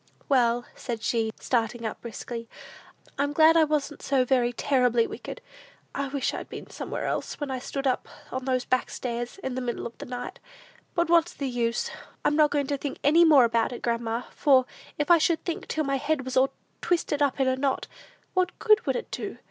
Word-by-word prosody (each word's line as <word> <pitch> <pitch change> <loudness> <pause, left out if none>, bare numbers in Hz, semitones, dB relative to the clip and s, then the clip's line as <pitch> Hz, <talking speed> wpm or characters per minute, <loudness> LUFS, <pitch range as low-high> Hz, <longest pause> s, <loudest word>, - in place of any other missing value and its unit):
"Well," 245 -3 +3
said 230 -4 -5
she, 225 -2 +1
starting 230 -1 -1
up 220 - -4
briskly, 230 0 -6 0.7
"I'm 285 +1 +1
glad 320 +1 +6
I 325 -1 +6
wasn't 295 -1 -1
so 270 -2 +2
very 245 -2 +2
terribly 245 -2 +2
wicked! - - -7 0.5
I 280 0 -2
wish 275 0 -1
I'd - - -6
been - - -9
somewhere - - -4
else, - - -3
when 290 -2 -3
I 260 - -2
stood 275 +2 -4
on 255 -2 +2 0.5
those 255 -1 0
back 255 - +1
stairs, 240 +2 -4
in 265 - -2
the 255 - -3
middle 240 -1 -3
of 235 - -6
the - - -7
night; 245 0 -6 0.6
but 340 -1 +2
what's 340 0 +3
the 280 - -3
use? 235 -2 -1 0.3
I'm 295 - +3
not 305 -1 +5
going 290 -1 0
to 280 0 -2
think 285 - -4
any 315 +5 +6
more 300 -6 +7
about 230 0 +1
it, 245 - -7
grandma; 235 0 -1
for 265 -3 +4 0.3
if 295 +3 +1
I 340 - +8
should 325 +1 +1
think 340 -3 -3
till 310 - -1
my 275 -1 0
head 290 -1 -1
was 260 - -4
all 260 +1 +4 0.3
twisted 330 -4 0
up 285 -1 +2
in 265 - +3
a 260 - +3
knot, 265 0 0 0.5
what 365 -1 0
good 430 -1 +4
would - - +2
it 485 - -4
do? - - -5
265 Hz, 205 wpm, -27 LUFS, 245-295 Hz, 0.7 s, I